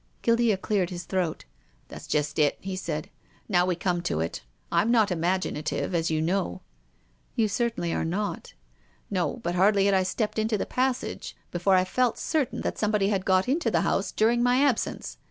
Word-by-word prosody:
Guildea 230 Hz, -3 st, +3 dB
cleared 195 Hz, -2 st, 0 dB
his 175 Hz, -2 st, -6 dB
throat. 180 Hz, -3 st, -2 dB, 0.2 s
" -, -, -37 dB
That's -, -, -9 dB
just 150 Hz, +1 st, 0 dB
it," 145 Hz, -2 st, +3 dB
he 190 Hz, 0 st, -5 dB
said, 160 Hz, -4 st, -4 dB, 0.2 s
" -, -, -33 dB
now 180 Hz, -3 st, +3 dB
wc 180 Hz, -2 st, -1 dB
come 175 Hz, -2 st, 0 dB
to 170 Hz, -, -1 dB
it. 80 Hz, +1 st, -3 dB, 0.3 s
Fm 220 Hz, -, +2 dB
not 220 Hz, -4 st, +4 dB
imaginative, 180 Hz, -1 st, -1 dB
as 165 Hz, -1 st, +1 dB
you 155 Hz, -1 st, 0 dB
know." 170 Hz, -, -1 dB, 0.4 s
" -, -, -39 dB
You 225 Hz, -2 st, +2 dB
certainly 215 Hz, -6 st, -1 dB
are -, -, -1 dB
not." 195 Hz, +6 st, -3 dB, 0.3 s
" -, -, -36 dB
No, -, -, 0 dB
but 175 Hz, -, -1 dB
hardly 195 Hz, +2 st, +4 dB
had 200 Hz, -, +3 dB
I 190 Hz, -, +4 dB
stepped 210 Hz, +4 st, -1 dB
into 220 Hz, 0 st, +1 dB
the -, -, -2 dB
pas 255 Hz, 0 st, +1 dB
sage -, -, -7 dB
before 180 Hz, +2 st, +2 dB
I 185 Hz, -, +4 dB
felt 240 Hz, +5 st, +1 dB
certain 305 Hz, -6 st, -1 dB
that -, -, -3 dB
somebody 210 Hz, -2 st, +2 dB
had 195 Hz, -3 st, 0 dB
got 185 Hz, +1 st, +3 dB
into 300 Hz, +7 st, +1 dB
the -, -, +2 dB
house -, -, 0 dB
during 235 Hz, +2 st, +2 dB
my 245 Hz, +1 st, +3 dB
absence. 270 Hz, -6 st, -1 dB
190 Hz, 205 wpm, -27 LUFS, 170-220 Hz, 0.4 s, not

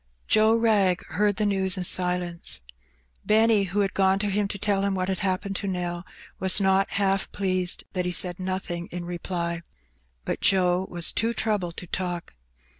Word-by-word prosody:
Joe 220 Hz, +1 st, +4 dB
Wrag 210 Hz, -6 st, +2 dB
heard 205 Hz, +5 st, +1 dB
the 215 Hz, -, 0 dB
news 190 Hz, -2 st, 0 dB
in 185 Hz, -, -2 dB
silence. 180 Hz, -, +1 dB, 0.6 s
Benny, 220 Hz, -1 st, +3 dB
who 195 Hz, +3 st, -1 dB
had 195 Hz, -1 st, -1 dB
gone 190 Hz, 0 st, +3 dB
to 205 Hz, 0 st, -1 dB
him 205 Hz, +1 st, 0 dB
to 200 Hz, -, -4 dB
tell 200 Hz, 0 st, +1 dB
him 200 Hz, -1 st, 0 dB
what 185 Hz, 0 st, -1 dB
had 190 Hz, -, -1 dB
happened 195 Hz, 0 st, -1 dB
to 200 Hz, -, -3 dB
Nell, 175 Hz, -1 st, -3 dB, 0.3 s
was 190 Hz, +1 st, +3 dB
not 195 Hz, 0 st, +2 dB
half 195 Hz, -1 st, 0 dB
pleased 185 Hz, -2 st, 0 dB
that 180 Hz, -1 st, -1 dB
he 180 Hz, -, -1 dB
said 180 Hz, 0 st, +1 dB
nothing 185 Hz, -2 st, -4 dB
in 175 Hz, 0 st, -6 dB
reply. 170 Hz, -1 st, -3 dB, 0.6 s
But -, -, -3 dB
Joe 185 Hz, -1 st, +2 dB
was 175 Hz, -1 st, +2 dB
too 230 Hz, +1 st, 0 dB
troubled 195 Hz, -6 st, -1 dB
to -, -, -5 dB
talk. 175 Hz, 0 st, -4 dB
190 Hz, 180 wpm, -25 LUFS, 180-200 Hz, 0.6 s, Joe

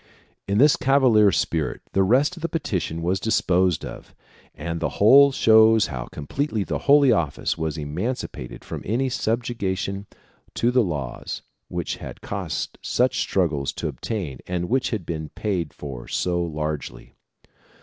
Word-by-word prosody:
In 100 Hz, -, +1 dB
this 145 Hz, +5 st, +5 dB
cavalier 125 Hz, -7 st, +4 dB
spirit 80 Hz, -2 st, -1 dB
the 95 Hz, -, +2 dB
rest 130 Hz, -, +3 dB
of 170 Hz, -, -11 dB
the 170 Hz, -, -2 dB
petition 85 Hz, -, -2 dB
was 90 Hz, +3 st, +1 dB
disposed 90 Hz, -5 st, +1 dB
of, -, -, -10 dB, 0.4 s
and 85 Hz, +2 st, -4 dB
the -, -, -3 dB
whole 140 Hz, +7 st, +7 dB
shows 110 Hz, -3 st, +5 dB
how 60 Hz, -, -5 dB
completely 110 Hz, -, -3 dB
the -, -, -3 dB
Holy 140 Hz, -2 st, +7 dB
Office 85 Hz, -10 st, 0 dB
was 80 Hz, -1 st, -3 dB
emancipated 75 Hz, -, -5 dB
from -, -, -6 dB
any 125 Hz, +6 st, 0 dB
subjection 100 Hz, -5 st, -2 dB, 0.5 s
to 120 Hz, -, +2 dB
the 125 Hz, 0 st, +4 dB
laws 70 Hz, -, -4 dB, 0.2 s
which 85 Hz, -2 st, -3 dB
had -, -, -9 dB
cost -, -, -4 dB
such 125 Hz, +1 st, +1 dB
struggles 80 Hz, -7 st, 0 dB
to -, -, -3 dB
obtain 90 Hz, -, -4 dB
and 90 Hz, -1 st, -2 dB
which 130 Hz, +1 st, +1 dB
had 105 Hz, -8 st, -3 dB
been 80 Hz, -2 st, -4 dB
paid 90 Hz, -8 st, -2 dB
for 65 Hz, -5 st, -8 dB
so 90 Hz, -1 st, 0 dB
largely. 75 Hz, -6 st, -4 dB
95 Hz, 150 wpm, -23 LUFS, 80-120 Hz, 0.5 s, whole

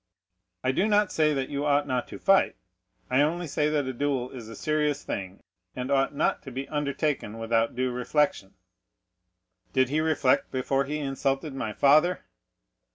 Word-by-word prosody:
"I 130 Hz, -, +2 dB
do 190 Hz, +10 st, +1 dB
not 210 Hz, -2 st, +3 dB
say 155 Hz, -1 st, +2 dB
that 135 Hz, -1 st, -2 dB
you 140 Hz, 0 st, -2 dB
ought 145 Hz, 0 st, +2 dB
not 130 Hz, -3 st, -2 dB
to -, -, -8 dB
fight, 195 Hz, -1 st, +3 dB, 0.6 s
I 130 Hz, +2 st, +4 dB
only 170 Hz, +4 st, 0 dB
say 150 Hz, 0 st, 0 dB
that 150 Hz, -2 st, 0 dB
a 130 Hz, -, -3 dB
duel 130 Hz, -1 st, -1 dB
is 115 Hz, -4 st, -9 dB
a 115 Hz, -, -9 dB
serious 150 Hz, +2 st, 0 dB
thing, 95 Hz, 0 st, -5 dB, 0.3 s
and 125 Hz, +2 st, -4 dB
ought 135 Hz, +1 st, +2 dB
not 150 Hz, -, +1 dB
to 135 Hz, -, -9 dB
be 135 Hz, +2 st, -5 dB
undertaken 140 Hz, -6 st, -2 dB
without 115 Hz, 0 st, 0 dB
due 130 Hz, 0 st, 0 dB
reflection." 125 Hz, -5 st, 0 dB, 1.2 s
"Did 130 Hz, -1 st, +3 dB
he 150 Hz, +3 st, +1 dB
reflect 155 Hz, -5 st, +2 dB
before 135 Hz, +1 st, 0 dB
he 150 Hz, +2 st, -3 dB
insulted 135 Hz, 0 st, -2 dB
my 110 Hz, -5 st, -3 dB
father?" 155 Hz, -, +3 dB
140 Hz, 170 wpm, -27 LUFS, 130-150 Hz, 1.2 s, I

